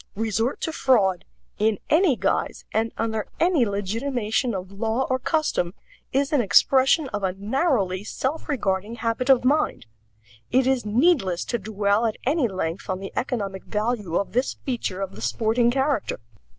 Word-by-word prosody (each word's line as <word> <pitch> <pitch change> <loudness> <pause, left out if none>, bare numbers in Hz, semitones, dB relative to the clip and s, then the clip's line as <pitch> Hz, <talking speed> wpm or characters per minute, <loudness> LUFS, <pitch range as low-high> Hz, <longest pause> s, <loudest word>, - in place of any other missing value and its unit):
Resort 225 +3 -1
to 320 - -1
fraud, 205 - +2 0.3
in 215 0 +2
any 320 -2 +4
guise 195 -2 -1
and 225 +1 +1
under 220 -2 -2
any 330 -9 +3
legitimation 220 +3 -1
of 185 0 -6
law 225 +5 -1
or 260 - +1
custom, 255 - 0 0.4
is 275 +2 0
an 285 - +4
expression 265 - +4
of 205 -3 -3
a 190 -2 0
narrowly 205 - 0
self 265 +9 -3
regarding 210 -5 -1
habit 230 +3 -2
of 255 -2 +5
mind. 290 - +1 0.6
It 255 +1 +3
is 260 -4 +1
needless 220 - +2
to 235 - -2
dwell 205 +2 +1
at 220 - -3
any 280 -1 +2
length 185 -3 -4
on 185 - 0
the 195 - -7
economic 200 -7 -3
value 210 -5 -2
of 200 - 0
this 250 +3 0
feature 225 -7 -2
of 195 -1 -4
the - - -10
sporting 235 +1 +1
character. 270 - 0
225 Hz, 160 wpm, -24 LUFS, 200-265 Hz, 0.6 s, of